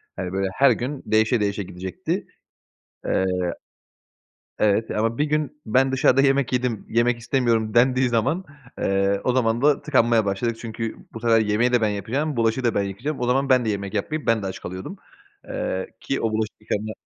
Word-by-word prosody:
Hani, 95 Hz, -1 st, -4 dB
böyle 95 Hz, 0 st, 0 dB
her 140 Hz, -, +5 dB
gün 135 Hz, +3 st, -3 dB
değişe 110 Hz, +2 st, +2 dB
değişe 100 Hz, -1 st, -1 dB
gidecekti. 95 Hz, 0 st, -4 dB, 0.8 s
Iıı, 90 Hz, -1 st, 0 dB, 1.1 s
evet, 105 Hz, +1 st, +2 dB
ama 115 Hz, +3 st, -1 dB
"Bir 150 Hz, -, +3 dB
gün 150 Hz, 0 st, -2 dB
ben 130 Hz, +4 st, +3 dB
dışarıda 130 Hz, 0 st, +4 dB
yemek 135 Hz, -2 st, +2 dB
yedim, 125 Hz, -3 st, -1 dB
yemek 120 Hz, +1 st, +2 dB
istemiyorum." 115 Hz, -3 st, 0 dB
dendiği 125 Hz, +1 st, +4 dB
zaman, 120 Hz, -, 0 dB, 0.4 s
ııı, 100 Hz, 0 st, +1 dB
o 125 Hz, -, +2 dB
zaman 120 Hz, -1 st, +1 dB
da 145 Hz, -1 st, +3 dB
tıkanmaya 115 Hz, -6 st, +3 dB
başladık 110 Hz, +4 st, -1 dB
çünkü 115 Hz, -1 st, -5 dB, 0.2 s
bu 115 Hz, -, -8 dB
sefer 115 Hz, -1 st, +4 dB
yemeği 110 Hz, +4 st, +1 dB
de 125 Hz, -, +4 dB
ben 110 Hz, -, +2 dB
yapacağım, 120 Hz, +9 st, -2 dB
bulaşığı 115 Hz, +2 st, +1 dB
da 120 Hz, -, +2 dB
ben 100 Hz, -, +2 dB
yıkayacağım. 115 Hz, +10 st, -4 dB
O 125 Hz, -, 0 dB
zaman 135 Hz, +3 st, +1 dB
ben 130 Hz, -2 st, +4 dB
de 110 Hz, -, -1 dB
yemek 100 Hz, -1 st, -3 dB
yapmayıp, 150 Hz, +9 st, -2 dB
ben 115 Hz, -2 st, +2 dB
de 95 Hz, -, -3 dB
aç 95 Hz, -, -5 dB
kalıyordum, 95 Hz, +1 st, -7 dB, 0.5 s
ııı, 95 Hz, 0 st, -3 dB
ki 135 Hz, -, -2 dB
o 115 Hz, -, 0 dB
bulaşık 110 Hz, 0 st, -2 dB
yıkama 105 Hz, 0 st, -3 dB
115 Hz, 185 wpm, -23 LUFS, 105-130 Hz, 1.1 s, her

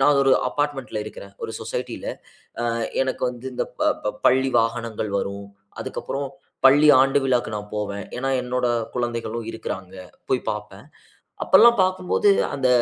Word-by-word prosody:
நான் 145 Hz, +1 st, +5 dB
ஒரு 135 Hz, -, +3 dB, 0.2 s
அபார்ட்மென்ட்‌ல 145 Hz, -4 st, -2 dB
இருக்குறேன், 100 Hz, -2 st, -10 dB
ஒரு -, -, -3 dB
சொசைட்டில. -, -, -5 dB, 0.6 s
ஆ -, -, 0 dB, 0.3 s
எனக்கு 130 Hz, -1 st, -2 dB
வந்து 125 Hz, 0 st, -10 dB
இந்த -, -, -1 dB, 0.2 s
ப -, -, -4 dB, 0.2 s
ப 105 Hz, -, 0 dB
பள்ளி 130 Hz, +1 st, +4 dB
வாகனங்கள் 115 Hz, -1 st, -2 dB
வரும். 100 Hz, 0 st, -4 dB, 0.3 s
அதற்கப்புறம், 140 Hz, 0 st, -4 dB, 0.4 s
பள்ளி 145 Hz, +3 st, +7 dB
ஆண்டு 135 Hz, +1 st, +4 dB
விழாக்கு 125 Hz, -4 st, +1 dB
நான் 105 Hz, 0 st, -6 dB
போவேன். 100 Hz, -1 st, -3 dB
ஏன்னா, 135 Hz, +2 st, -1 dB
என்னோட 125 Hz, 0 st, -1 dB, 0.3 s
குழந்தைகளும் 120 Hz, -1 st, -3 dB
இருக்கிறாங்க. 95 Hz, -4 st, -6 dB, 0.4 s
போய் 130 Hz, -, +2 dB
பாப்பேன். 105 Hz, +1 st, -6 dB, 0.6 s
அப்பல்லாம் 235 Hz, -1 st, +7 dB
பாக்கும்போது, 185 Hz, +2 st, +2 dB, 0.2 s
அந்த 135 Hz, -2 st, +1 dB
125 Hz, 140 wpm, -23 LUFS, 110-135 Hz, 0.6 s, பள்ளி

